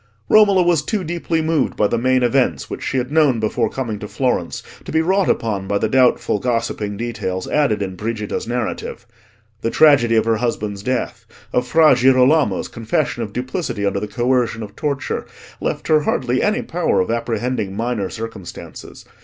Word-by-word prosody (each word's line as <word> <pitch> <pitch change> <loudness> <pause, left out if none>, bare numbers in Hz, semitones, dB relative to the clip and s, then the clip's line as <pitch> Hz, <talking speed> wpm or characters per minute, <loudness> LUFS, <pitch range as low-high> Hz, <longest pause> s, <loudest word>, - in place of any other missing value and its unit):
Romola 200 -4 +6
was 170 -3 +3
too 195 +6 -2
deeply 165 -1 -2
moved 160 -1 0
by 105 - +2
the - - +1
main 130 +2 +2
events 120 - +1
which - - -5
she - - -2
had 125 +1 -2
known 150 -6 +3
before 110 +1 0
coming 115 -6 -4
to 105 - -6
Florence, 125 -8 -1 0.2
to - - -8
be 160 - +2
wrought 190 +3 +2
upon 100 -4 -1
by 100 - +1
the - - 0
doubtful 130 -5 +2
gossiping 115 -3 -2
details 95 -6 -3
added 110 -9 +1
in 95 -1 -5
Brigida's 105 +1 -4
narrative. 120 +1 -4 0.6
The 115 - 0
tragedy 130 -6 +5
of 110 - +3
her 115 -1 +2
husband's 105 -4 -2
death, 125 +3 -3 0.3
of 125 0 +1
Fra 155 +3 +5
Girolamo's 130 -2 +3
confession 120 +2 -2
of 110 -3 -4
duplicity 125 - -3
under 100 0 0
the 105 - -4
coercion 120 0 0
of 105 0 -10
torture, 140 -2 -3 0.3
left - - -3
her 155 -1 +5
hardly 130 -4 0
any 215 +3 +1
power 175 0 0
of 95 - 0
apprehending 115 -3 -2
minor 115 -3 -2
circumstances. 110 -5 -9
120 Hz, 175 wpm, -19 LUFS, 110-145 Hz, 0.6 s, Romola